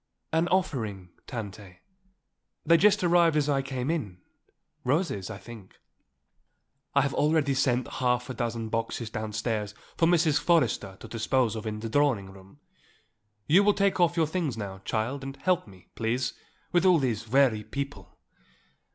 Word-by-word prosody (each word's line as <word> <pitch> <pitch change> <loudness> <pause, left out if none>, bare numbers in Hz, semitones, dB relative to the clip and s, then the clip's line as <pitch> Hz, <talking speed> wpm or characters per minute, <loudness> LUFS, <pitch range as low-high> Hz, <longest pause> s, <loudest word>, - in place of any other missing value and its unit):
"An 165 +2 +2
offering, 110 - -1 0.2
Tante; 100 -5 -7 0.9
they 170 - +6
just 205 +3 +4
arrived 170 -2 +4
as 150 -1 +1
I 140 -2 +2
came 135 +1 -3
in. 110 - -3 0.7
Roses, 130 - 0
I - - -6
think." 105 -1 -12 1.2
"I 140 - +6
have 140 0 -1
already 150 -2 +2
sent 130 -1 +1
half 125 -1 0
a 130 - -5
dozen 115 -3 -3
boxes 115 0 -3
downstairs 105 -1 -3 0.2
for 165 - +4
Mrs. 160 -4 +3
Forrester 130 - +1
to - - -8
dispose 115 0 0
of 110 0 -5
in 105 0 -4
the 115 - -3
drawing 120 -8 +1
room. 95 +6 -16 0.9
You 180 +7 +5
will 205 0 +4
take 200 -1 +1
off 175 0 +3
your 165 - +4
things 155 -6 -2
now, 100 -3 -6
child, 120 +5 -2
and 135 +1 -7
help 180 -1 0
me, 95 -2 -17
please, 120 +3 -1 0.4
with 175 0 +3
all 185 -2 +6
these 115 -6 -1
weary 120 -3 +3
people. 140 - -6
130 Hz, 155 wpm, -27 LUFS, 110-160 Hz, 1.2 s, they